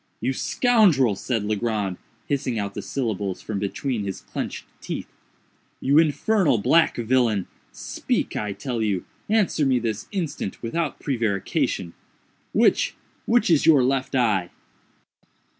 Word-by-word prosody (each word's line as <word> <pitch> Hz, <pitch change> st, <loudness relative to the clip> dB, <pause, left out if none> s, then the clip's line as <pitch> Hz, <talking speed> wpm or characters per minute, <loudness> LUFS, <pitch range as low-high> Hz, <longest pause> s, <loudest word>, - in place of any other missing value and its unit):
"You 130 Hz, -, 0 dB
scoundrel," 180 Hz, -, +3 dB
said 115 Hz, +2 st, -2 dB
Legrand, 105 Hz, -3 st, -1 dB, 0.3 s
hissing 130 Hz, -4 st, -1 dB
out 100 Hz, -1 st, -3 dB
the 105 Hz, -, -5 dB
syllables 100 Hz, -4 st, -2 dB
from 105 Hz, -3 st, -4 dB
between 110 Hz, +3 st, -2 dB
his 95 Hz, -1 st, -5 dB
clenched -, -, -5 dB, 0.2 s
teeth—"you 140 Hz, +3 st, -3 dB
infernal 165 Hz, -, +3 dB
black 160 Hz, +11 st, +3 dB
villain!—speak, 115 Hz, -4 st, -1 dB
I 105 Hz, -1 st, -2 dB
tell 120 Hz, 0 st, -3 dB
you!—answer 150 Hz, -, 0 dB
me 130 Hz, -2 st, +3 dB
this 110 Hz, -3 st, -3 dB
instant, 160 Hz, -, -4 dB
without 150 Hz, +6 st, -2 dB
prevarication!—which—which 115 Hz, -, -1 dB
is 155 Hz, -, +4 dB
your 145 Hz, -5 st, +7 dB
left 135 Hz, +1 st, 0 dB
eye?" 105 Hz, -8 st, +2 dB
120 Hz, 110 wpm, -24 LUFS, 105-145 Hz, 0.3 s, your